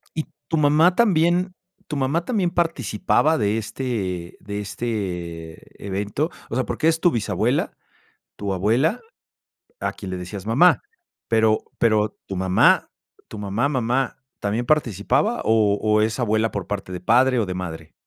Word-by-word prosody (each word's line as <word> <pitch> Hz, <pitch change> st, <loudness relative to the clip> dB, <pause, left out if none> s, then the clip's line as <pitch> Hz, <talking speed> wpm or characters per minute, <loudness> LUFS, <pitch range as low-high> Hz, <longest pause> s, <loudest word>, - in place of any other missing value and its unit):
¿Y 155 Hz, -, -2 dB, 0.2 s
tu 160 Hz, -, 0 dB
mamá 155 Hz, +5 st, +4 dB
también 180 Hz, -3 st, +3 dB, 0.3 s
tu 150 Hz, -, -4 dB
mamá 140 Hz, +5 st, 0 dB
también 200 Hz, -8 st, +1 dB
participaba 160 Hz, -, +1 dB
de 105 Hz, 0 st, +1 dB
este 105 Hz, -7 st, -4 dB
de 100 Hz, 0 st, -5 dB
este 90 Hz, -7 st, -5 dB
evento?, 100 Hz, -, -2 dB, 0.2 s
o 115 Hz, -, -4 dB
sea, 130 Hz, -, 0 dB
porque 160 Hz, -, -1 dB
es 160 Hz, 0 st, +1 dB
tu 175 Hz, -, +4 dB
bisabuela, 110 Hz, -3 st, 0 dB, 0.6 s
tu 100 Hz, -1 st, -3 dB
abuela, 120 Hz, -, +1 dB, 0.8 s
a -, -, -2 dB
quien 95 Hz, -2 st, -8 dB
le 90 Hz, -, -3 dB
decías 95 Hz, +2 st, -7 dB
"mamá", 140 Hz, +11 st, +5 dB, 0.5 s
pero 110 Hz, -1 st, +3 dB, 0.2 s
pero, 110 Hz, -2 st, +2 dB
tu 95 Hz, -, -5 dB
mamá, 95 Hz, 0 st, +3 dB, 0.4 s
tu 105 Hz, -, -8 dB
mamá, 105 Hz, +6 st, 0 dB
mamá, 130 Hz, -1 st, 0 dB, 0.2 s
también 105 Hz, +4 st, -1 dB
participaba 140 Hz, -, +1 dB
o 110 Hz, -2 st, +3 dB
o 105 Hz, 0 st, +3 dB
es 110 Hz, +2 st, 0 dB
abuela 110 Hz, -2 st, +1 dB
por 100 Hz, -3 st, -4 dB
parte 100 Hz, -2 st, -5 dB
de 90 Hz, -, -5 dB
padre 125 Hz, +5 st, +3 dB
o 110 Hz, -, +2 dB
de 90 Hz, -, -4 dB
madre? 80 Hz, -3 st, -6 dB
110 Hz, 155 wpm, -22 LUFS, 100-145 Hz, 0.8 s, mamá